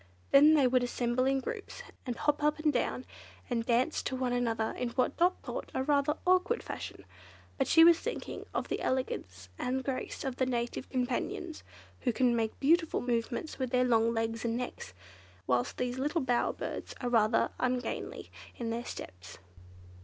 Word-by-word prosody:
Then 300 +3 +8
they 285 -3 +5
would 255 0 +3
assemble 245 +1 0
in 270 0 +2
groups, 440 - -6 0.2
and 245 - -2
hop 295 +4 0
up 300 0 +2
and 310 -1 +1
down, 250 +1 -1 0.5
and 230 -1 +1
dance 245 +6 +1
to 260 - -3
one 255 -1 -1
another 225 -2 0
in 250 -1 -3
what 250 +2 0
Dot 355 +2 +3
thought - - -5
a 260 - +1
rather 290 +1 +2
awkward 370 +6 +3
fashion; - - -7 0.5
but 270 - +2
she 325 - +7
was 335 0 +7
thinking 480 - -5
of - - -2
the - - -2
elegance 95 - -2
and 260 +1 -1
grace 265 -1 -4
of 265 -2 -3
the 260 - +1
Native 240 +1 -2
Companions, 260 +6 -2 0.4
who 250 - +1
can 245 0 +2
make 225 -1 -1
beautiful 325 +3 +3
movements 245 +5 -2
with 260 -1 -1
their 250 0 +3
long 230 -1 +3
legs 225 0 -2
and 230 0 0
necks, 240 - -6 0.5
whilst 120 +2 0
these 250 +1 -2
little 300 +5 0
bower 245 -2 +1
birds - - -6
are 245 - -2
rather 225 -1 +3
ungainly 255 0 -2 0.2
in 230 -1 -3
their 235 +1 -3
steps. 90 - -8
250 Hz, 175 wpm, -31 LUFS, 235-280 Hz, 0.5 s, Then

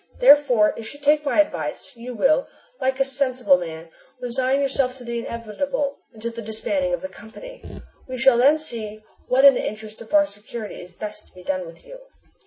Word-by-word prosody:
Therefore, 285 - +6
if 225 +5 -8
you - - -14
take 295 +1 +3
my 295 +1 +1
advice, 305 - -1
you 240 +1 -8
will, 310 - +3 0.3
like 265 +1 0
a 270 - +3
sensible 255 -7 +2
man, 165 -1 -7 0.3
resign 255 +2 0
yourself 270 -2 0
to 250 - -11
the 235 0 -3
inevitable 260 +5 -3
until 230 +1 -6
the 230 0 -7
disbanding 270 +6 -2
of - - -12
the 280 - -4
company. 285 - -12 0.4
We 255 -1 -5
shall 245 -1 +5
then 285 +5 +6
see 215 -8 -6 0.2
what 265 +2 +4
in 280 - +10
the - - -2
interest 215 0 -6
of 225 - -12
our 300 -1 +5
security 210 -1 -8
is 180 - -12
best 210 +3 -7
to - - -25
be 180 - -12
done 185 -2 -2
with 165 0 -14
you!" - - -11
245 Hz, 195 wpm, -23 LUFS, 215-280 Hz, 0.4 s, in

